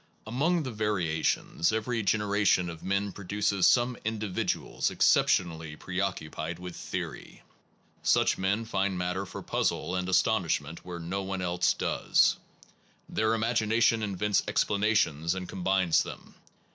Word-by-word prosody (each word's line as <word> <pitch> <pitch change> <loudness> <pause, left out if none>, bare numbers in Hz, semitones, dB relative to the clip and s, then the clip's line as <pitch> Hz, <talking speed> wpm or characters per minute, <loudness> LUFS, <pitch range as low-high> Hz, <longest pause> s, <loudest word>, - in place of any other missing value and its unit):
Among 155 +9 +1
the 130 - -4
variations, 90 -5 0
every 110 +1 -1
generation 100 -3 +2
of 80 - -11
men 100 +1 -1
produces 100 0 +1
some 120 0 +3
individuals 110 -3 -1
exceptionally 80 -3 +2
Phiioso - - -25
preoccupied 85 -3 -3
with 90 0 -8
theory. - - -6 0.6
Such - - +3
men 95 +4 0
those 110 - -13
who - - -2
^ 95 - +3
n( 100 - -1
^ - - -4
matter 90 +2 -2
for - - -8
puzzle 85 +4 -1
and 90 0 -2
astonish 95 - +2
ment 75 +3 -10
where 90 -1 -7
no 85 +4 -3
one 95 -1 -3
else 90 0 +1
does. - - +2 0.7
Their 110 +1 +1
imagination 115 0 +2
invents 105 0 0
explanations 100 -6 +1
and 95 -1 -5
com 95 - -7
bines 95 -3 +3
them. - - -8
95 Hz, 145 wpm, -29 LUFS, 90-110 Hz, 0.7 s, some